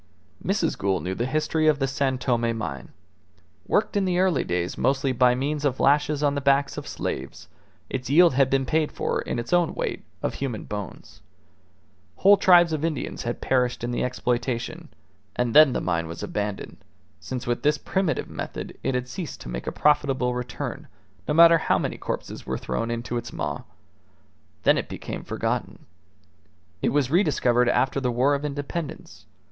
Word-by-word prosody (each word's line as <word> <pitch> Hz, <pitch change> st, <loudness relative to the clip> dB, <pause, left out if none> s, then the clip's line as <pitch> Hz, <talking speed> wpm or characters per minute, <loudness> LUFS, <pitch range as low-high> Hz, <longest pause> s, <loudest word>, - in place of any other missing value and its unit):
Mrs. 185 Hz, -3 st, 0 dB
Gould 95 Hz, -1 st, 0 dB
knew 95 Hz, -, -2 dB
the 120 Hz, +6 st, -2 dB
history 155 Hz, +2 st, 0 dB
of 155 Hz, -2 st, +4 dB
the 135 Hz, -, 0 dB
San 135 Hz, -1 st, 0 dB
Tome 120 Hz, -3 st, 0 dB
mine. 80 Hz, -10 st, -5 dB, 0.8 s
Worked -, -, +1 dB
in 200 Hz, -1 st, +2 dB
the 180 Hz, -1 st, 0 dB
early 185 Hz, -5 st, +2 dB
days 90 Hz, 0 st, -2 dB
mostly 135 Hz, 0 st, +1 dB
by 125 Hz, 0 st, +4 dB
means 145 Hz, +3 st, -2 dB
of 135 Hz, -3 st, 0 dB
lashes 150 Hz, +1 st, +2 dB
on 145 Hz, -1 st, +3 dB
the 140 Hz, -, -2 dB
backs 140 Hz, 0 st, +2 dB
of -, -, -6 dB
slaves, 65 Hz, +1 st, -5 dB, 0.4 s
its 130 Hz, -2 st, -4 dB
yield 170 Hz, +2 st, +6 dB
had 135 Hz, 0 st, +3 dB
been 135 Hz, 0 st, +1 dB
paid 155 Hz, +3 st, +1 dB
for -, -, -2 dB
in -, -, -3 dB
its 120 Hz, +7 st, -3 dB
own 175 Hz, -2 st, +2 dB
weight -, -, -3 dB, 0.2 s
of -, -, -1 dB
human 125 Hz, -6 st, -4 dB
bones. 105 Hz, -3 st, -8 dB, 0.9 s
Whole 200 Hz, +2 st, +6 dB
tribes 175 Hz, -4 st, +6 dB
of 155 Hz, -1 st, -2 dB
Indians 160 Hz, -5 st, -2 dB
had 120 Hz, 0 st, -4 dB
perished 125 Hz, -2 st, 0 dB
in 120 Hz, -, -2 dB
the 120 Hz, -, -1 dB
exploitation; 125 Hz, -1 st, -2 dB, 0.5 s
and 125 Hz, -2 st, 0 dB
then 155 Hz, -2 st, +8 dB
the -, -, 0 dB
mine 85 Hz, -2 st, -1 dB
was 85 Hz, +1 st, -7 dB
abandoned, 105 Hz, -1 st, -4 dB, 0.4 s
since 130 Hz, -1 st, -5 dB
with 120 Hz, 0 st, -1 dB
this 150 Hz, +1 st, +2 dB
primitive 190 Hz, -1 st, -1 dB
method -, -, -6 dB
it 130 Hz, -, -1 dB
had 125 Hz, 0 st, -2 dB
ceased 160 Hz, +4 st, -6 dB
to -, -, -8 dB
make -, -, -5 dB
a -, -, 0 dB
profitable 135 Hz, -4 st, +2 dB
return, 125 Hz, -1 st, -5 dB, 0.4 s
no -, -, +1 dB
matter 165 Hz, 0 st, +8 dB
how -, -, +2 dB
many -, -, -3 dB
corpses -, -, -5 dB
were -, -, -3 dB
thrown 65 Hz, -, -3 dB
into 120 Hz, 0 st, -3 dB
its 120 Hz, -, -5 dB
maw. 75 Hz, -2 st, -3 dB, 1.0 s
Then -, -, +4 dB
it -, -, -6 dB
became -, -, -6 dB
forgotten. -, -, -3 dB, 1.0 s
It -, -, +2 dB
was 140 Hz, -2 st, +1 dB
rediscovered 125 Hz, -, +3 dB
after 130 Hz, +2 st, +1 dB
the 125 Hz, -2 st, 0 dB
War 130 Hz, +4 st, +2 dB
of 140 Hz, 0 st, -1 dB
Independence. 145 Hz, +2 st, -5 dB
130 Hz, 180 wpm, -25 LUFS, 120-150 Hz, 1.0 s, then